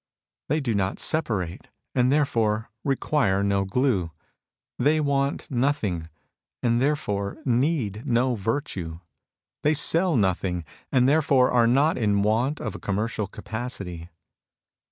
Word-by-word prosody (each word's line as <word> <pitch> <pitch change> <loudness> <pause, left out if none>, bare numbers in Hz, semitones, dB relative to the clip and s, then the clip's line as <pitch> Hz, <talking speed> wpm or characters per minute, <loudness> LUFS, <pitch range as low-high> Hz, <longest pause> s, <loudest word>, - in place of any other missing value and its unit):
They 155 +2 +1
do 120 -5 -1
not 100 -1 0
separate, 105 - -1 0.3
and 125 0 +3
therefore 115 -7 +1
require 130 -8 +1
no 100 -1 +1
glue. 100 -5 +1 0.7
They 155 +2 +3
want 140 -1 -1
nothing, 120 - 0 0.5
and 120 0 +2
therefore 105 -9 -1
need 125 - 0
no 125 +2 +2
virtue. 100 - -3 0.6
They 150 +1 +2
sell 165 +3 +2
nothing, 90 -5 0 0.3
and 125 -1 +4
therefore 140 -3 +4
are 120 -2 +4
not 140 +6 +3
in 100 -3 +2
want 120 +8 +1
of - - -4
a - - -8
commercial 105 +1 -2
capacity. 100 -7 -6
120 Hz, 120 wpm, -25 LUFS, 100-140 Hz, 0.7 s, and